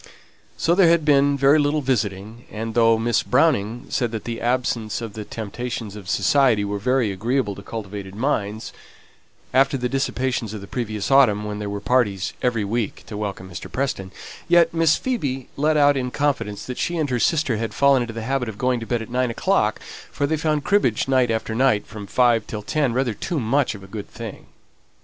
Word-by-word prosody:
So 170 - +2
there 185 -1 +5
had 165 -2 +3
been 140 -1 +4
very 140 +3 +5
little 145 +1 +1
visiting; 110 -3 -2
and 110 +1 -5
though 115 -1 +4
Miss 115 -1 +1
Browning 125 -2 +1
said 120 -3 0
that 110 - -4
the 115 -1 -5
absence 120 -3 -1
of 115 -3 -6
the 110 - -6
temptations 115 0 -5
of 100 -4 -9
society 125 -4 +3
was 100 0 -3
very 125 -2 +1
agreeable 110 +2 -1
to 100 - -10
cultivated 100 -2 -7
minds, 110 -3 -2 0.8
after 135 +1 +3
the 125 -1 -1
dissipations 130 -4 -2
of 105 - -7
the - - -8
previous 110 0 -3
autumn, 115 -7 +5
when 105 0 -4
there 105 -1 -4
were 100 0 -4
parties 100 -5 +1
every 115 -4 0
week 110 0 -2
to 110 - -8
welcome 100 -3 -4
Mr. 90 -3 -8
Preston, 130 -9 -2 0.4
yet 175 0 +4
Miss 165 -2 +4
Phoebe 140 - -3
let 155 +2 +2
out 145 -1 +5
in 125 -2 -1
confidence 125 -7 -1
that 125 - -6
she 175 - -1
and 150 -4 -1
her 125 - +1
sister 140 -5 +1
had 115 0 -3
fallen 140 +3 +4
into 120 -1 -3
the 115 - -4
habit 130 0 -1
of 105 - -8
going 125 0 +1
to 115 - -7
bed 120 -2 -1
at - - -12
nine 125 0 +1
o'clock, 115 - +1 0.3
for 145 - -1
they 155 +3 0
found 150 -1 0
cribbage 165 - +2
night 130 -2 +3
after 110 0 -1
night, 115 -3 +2
from 105 -2 -9
five 120 +2 +3
o'clock - - -27
till 105 -2 -5
ten, 145 +2 0
rather 125 -2 0
too 165 - -3
much 130 0 +1
of 100 - -11
a - - -11
good 105 -2 -6
thing. - - -9
120 Hz, 205 wpm, -22 LUFS, 105-135 Hz, 0.8 s, there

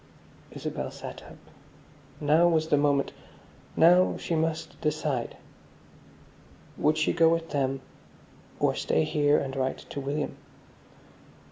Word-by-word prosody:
Isabel - - -5
sat - - -9
up. - - -13 0.8
Now 155 +4 +4
was 160 -2 +1
the 150 - +4
moment, 140 -1 +2 0.6
now 180 +3 +5
she 170 - -4
must 160 0 -2
decide. 150 -5 -2 1.4
Would 155 +1 +1
she 155 - +1
go 165 -2 +5
with 165 0 -1
them, 135 -2 -1 0.8
or - - +2
stay 80 - +1
here 145 - +2
and 135 0 -3
write 130 -1 -1
to - - -4
William. 145 +2 -3
150 Hz, 120 wpm, -27 LUFS, 140-160 Hz, 1.4 s, now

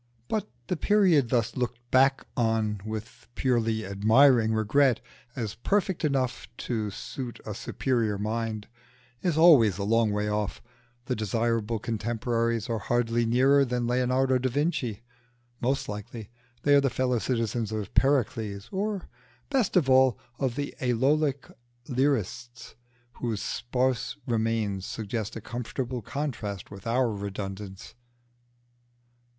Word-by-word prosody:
But 215 - -2 0.2
the 180 - -2
period 180 - +4
thus 115 -2 +1
looked 125 -1 -2
back 135 +1 +4
on 110 -3 0
with 110 +1 -7
a - - -15
purely 115 -4 +1
admiring 110 +4 +4
regret, 115 +3 +3 0.4
as 110 -6 -3
perfect 190 - 0
enough 135 -4 0 0.2
to 110 -4 -1
suit 125 +4 -6
a 105 - -4
superior 115 -1 -1
mind, 110 0 -3 0.5
is 175 -4 0
always 135 - +7
a 100 - -2
long 115 +2 +3
way 105 0 -1
off; 105 -1 -2 0.5
the 125 - -1
desirable 115 +1 0
contemporaries 115 +1 -1
are 115 -2 -1
hardly 120 +1 +1
nearer 135 +4 +5
than 125 -2 -1
Leonardo 130 +1 +2
da 130 +1 0
Vinci, 125 - -1 0.6
most 135 +3 0
likely 105 +1 -7 0.3
they 145 - +4
are 140 - +7
the 135 - +2
fellow 125 -1 0
citizens 115 -2 -1
of 105 -2 -4
Pericles, 115 -7 +1
or, 200 0 -2 0.4
best 255 -9 +2
of 160 -7 +3
all, 130 -1 +5 0.2
of 130 -4 0
the 145 0 -3
Aeolic 135 +3 +1 0.4
lyrists 120 -3 -1 0.4
whose 115 -4 -2
sparse 125 +1 -1
remains 110 -4 0
suggest 110 +1 -4
a 115 - -5
comfortable 125 +2 -4
contrast 110 -7 -4
with 100 +1 -9
our 120 0 +2
redundance. 100 -1 -6
120 Hz, 130 wpm, -27 LUFS, 110-130 Hz, 0.6 s, always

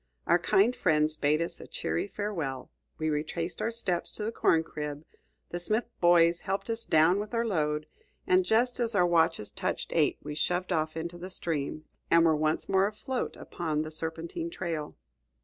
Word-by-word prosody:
Our 175 - +4
kind 205 +7 +3
friends 155 -3 +2
bade 155 +2 +2
us 170 - -4
a - - -10
cheery - - -2
farewell, 175 -11 -4 0.3
we 155 0 0
retraced 165 +3 -3
our - - +1
steps 215 -7 0
to 210 - -3
the 220 - -1
corn 165 -7 +3
crib, 150 -1 -6 0.5
the 175 - -3
Smith 215 +7 0
boys 170 -1 +5
helped 195 +4 -3
us 230 0 -3
down 160 +4 +4
with 210 +3 -4
our 230 0 +1
load, 150 -7 0 0.4
and 185 0 +4
just 235 +7 +2
as 230 -2 0
our 180 -3 +5
watches 165 -9 +2
touched - - -3
eight - - +2
we 150 - -5
shoved 180 +4 -1
off 160 -1 0
into 170 +2 -5
the 185 +2 -7
stream, 155 -4 -3 0.2
and 170 0 +6
were 160 -1 +4
once 155 +1 0
more 195 0 +3
afloat 250 +5 -4
upon 155 -3 -3
the 155 - -7
serpentine 165 - -3
trail. 165 - -4
170 Hz, 185 wpm, -29 LUFS, 155-200 Hz, 0.5 s, and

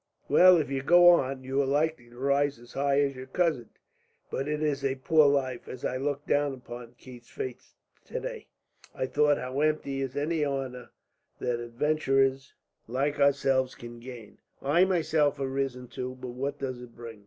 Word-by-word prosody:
Well, 185 0 +7
if 150 -4 -1
you 135 -1 -1
go 175 +5 +7
on, 135 -6 +2
you 135 +2 0
are - - 0
likely 145 -3 0
to 120 - -17
rise 140 +2 +1
as 120 +1 -16
high 140 +1 +2
as 140 -1 0
your 130 0 -8
cousin. 160 -10 0 0.6
But 135 - -2
it 150 0 -1
is 145 -2 -1
a 135 -1 0
poor 150 +3 +4
life. 130 -3 0
As 130 - -7
I 130 - -1
looked 145 +1 -2
down 145 -1 +1
upon 120 -1 -10
Keith's 125 -2 -13
face 130 -2 -7 0.3
today, - - -6 0.5
I - - -1
thought 145 +2 +2
how 130 +2 -4
empty 150 -3 0
is 135 -1 -4
any 155 +2 0
honour 135 -3 -3 0.5
that 120 -1 -2
adventurers 135 +2 0 0.3
like 140 +5 -1
ourselves 135 -2 +2
can 120 0 -10
gain. 120 -3 -11 0.2
I 160 +7 +3
myself 155 -5 +1
have 135 -1 -3
risen 135 -2 -3
too; 125 +2 -6
but 125 - -6
what 135 +4 -4
does 130 -3 -5
it 120 -1 -12
bring? 115 -2 -9
135 Hz, 180 wpm, -28 LUFS, 125-145 Hz, 0.6 s, Well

